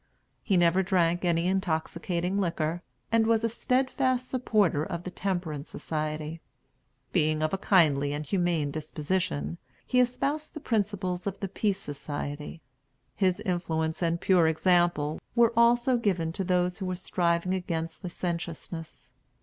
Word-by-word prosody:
He 195 -4 +2
never 175 +2 +4
drank 175 -2 +2
any 170 -1 +2
intoxicating 180 0 -1
liquor, 170 -1 -1 0.3
and 225 -1 +4
was 225 -1 +3
a 230 - +2
steadfast 255 +1 0
supporter 210 - +2
of 170 +2 -4
the 185 - -6
Temperance 175 -6 -3
Society. 155 +1 -4 0.7
Being 155 0 +2
of 155 - 0
a 195 - 0
kindly 150 -8 +3
and 150 +1 -3
humane 170 -3 0
disposition, 150 - -2 0.3
he 250 - +2
espoused 280 +6 0
the - - -4
principles 205 -7 -1
of 195 0 -3
the 195 - -2
Peace 200 +1 -1
Society. 145 0 -6 0.5
His 190 0 +1
influence 165 -5 -1
and 170 0 +1
pure 180 -3 +4
example 160 -2 +2
were 235 -1 +5
also 240 +2 +4
given 180 -8 0
to 195 - -2
those 180 +1 +1
who 190 - -3
were 185 - -1
striving 175 0 0
against 165 -2 -3
licentiousness. 170 -5 -5
175 Hz, 140 wpm, -28 LUFS, 160-200 Hz, 0.7 s, were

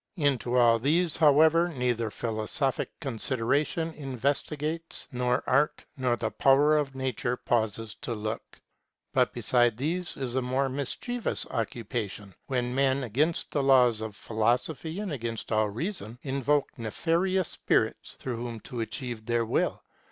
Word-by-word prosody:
Into 130 -5 +1
all 115 -1 +5
these, 160 +6 +3
however, 160 +2 +5
neither 125 -6 -1
philosophic 115 +5 0
consideration 140 +5 -1
investigates, 150 +4 -2
nor 125 -1 0
art, 150 +1 +2
nor 125 -3 +1
the 115 -2 -3
power 145 +3 +4
of 140 -3 0
nature 130 -2 -1
pauses 110 -2 -1
to 120 - -3
look. 110 +1 -5 0.5
But - - +3
beside 120 -3 +2
these 175 +7 -1
is 130 -3 -3
a 130 - +1
more 130 +2 0
mischievous 145 - -2
occupation, 105 -3 -4
when 125 -2 -1
men, 135 0 +2
against 145 +8 0
the 145 - +1
laws 125 -5 +5
of 110 -2 -5
philosophy 125 - -1
and 205 -4 -3
against 115 -5 -4
all 110 -1 +2
reason, 120 - -4
invoke 140 0 0
nefarious 170 - 0
spirits, - - 0
through 125 -3 -4
whom 120 -1 -5
to 125 -3 -5
achieve 120 -1 -5
their 120 -1 +1
will. 115 - 0
130 Hz, 135 wpm, -28 LUFS, 115-150 Hz, 0.5 s, all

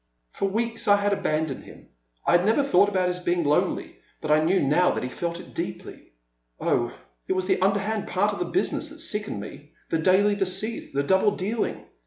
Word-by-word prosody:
For 195 - -1
weeks 230 +3 -2
I 205 - +7
had 205 0 +1
abandoned 155 -6 -1
him; - - -15 0.4
I 175 - +5
never 220 +10 +2
thought 200 -6 +4
about 185 -2 +1
his 180 0 -1
being 175 -1 0
lonely, 145 0 0 0.2
but 155 - -3
I 155 +1 +4
knew 185 +4 +3
now 150 +6 +3
that - - -2
he 125 - -3
had - - -12
felt 170 -1 -2
it - - -12
deeply. - - -7 0.5
Oh, - - +1 0.4
it - - +1
was 185 0 0
the 190 -1 +1
underhand 200 +2 0
part 205 +2 +1
of - - -6
the - - 0
business 340 -3 -1
that 310 - -10
sickened 210 - -2
me, 145 +8 -10 0.2
the 165 - +1
daily 190 +5 +4
deceit, 200 +3 0
the 140 +1 0
double 190 +6 +3
dealing. 210 +4 -2
190 Hz, 205 wpm, -25 LUFS, 170-205 Hz, 0.5 s, I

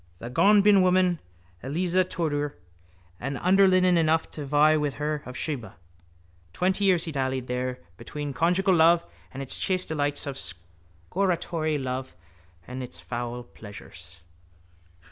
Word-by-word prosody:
The 120 +5 -8
gombeenwoman 185 -1 +4 0.4
Eliza 175 +7 +1
Tudor 145 - -2 0.6
had 140 +2 -3
underlinen 185 0 +4
enough 160 0 +1
to 150 -2 -7
vie 150 +2 +4
with 150 -2 -1
her 150 0 -2
of 125 - -7
Sheba. 125 -10 -4 0.8
Twenty 190 +2 +1
years 180 -4 +3
he 165 - -4
dallied 130 -2 -2
there 125 0 -3 0.2
between 145 -1 -6
conjugial 180 +5 +2
love 170 0 +5 0.3
and 135 +5 -6
its 130 - -5
chaste 185 -1 0
delights 145 -2 -1
and 140 -2 -4
scortatory 90 - -3
love 130 -4 -4 0.5
and 130 +1 -6
its 120 -9 -7
foul 120 +7 -5
pleasures. 95 -6 -12
150 Hz, 125 wpm, -26 LUFS, 125-175 Hz, 0.8 s, love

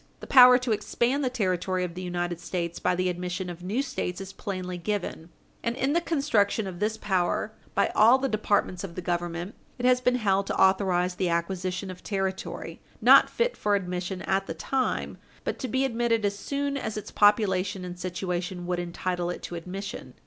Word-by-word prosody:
The - - -9
power 250 -2 +9
to 250 -2 -2
expand 240 +6 0
the 255 - +1
territory 185 -5 0
of 175 -2 -4
the 180 - -6
United 175 -1 -3
States 170 -1 -3
by 180 0 +1
the 185 +1 0
admission 180 +1 -3
of 175 0 -10
new 210 +9 -1
States 250 -9 -3
is 195 0 -7
plainly 185 -2 -5
given, 180 -3 -3 0.3
and, 235 0 -1
in 270 +2 0
the 340 - +2
construction 235 -10 +1
of 180 -2 -6
this 215 +1 0
power 190 +2 0 0.2
by 200 - +3
all 230 +5 +7
the 270 0 -1
departments 205 -5 0
of 175 -4 -7
the 180 - -5
Government, 175 +2 -2 0.2
it 245 - -3
has 250 0 +4
been 250 0 +3
held 200 -4 +1
to - - -2
authorize 190 -2 +3
the 180 0 -1
acquisition 185 +2 -2
of 180 - -11
territory 195 -2 -4 0.2
not - - +7
fit 485 +1 0
for 205 -1 +1
admission 180 -1 -3
at 195 0 0
the 165 - -4
time, 260 +9 -2 0.2
but - - -3
to 260 - -3
be 260 +3 +1
admitted 230 -3 +1
as 200 0 0
soon 280 +5 -2
as 220 -5 -4
its 210 0 -6
population 200 -2 +3
and 180 0 -7
situation 180 0 -3
would 180 0 -1
entitle 175 0 -2
it 175 - -5
to - - -6
admission. 185 +4 -6
190 Hz, 195 wpm, -27 LUFS, 180-220 Hz, 0.3 s, power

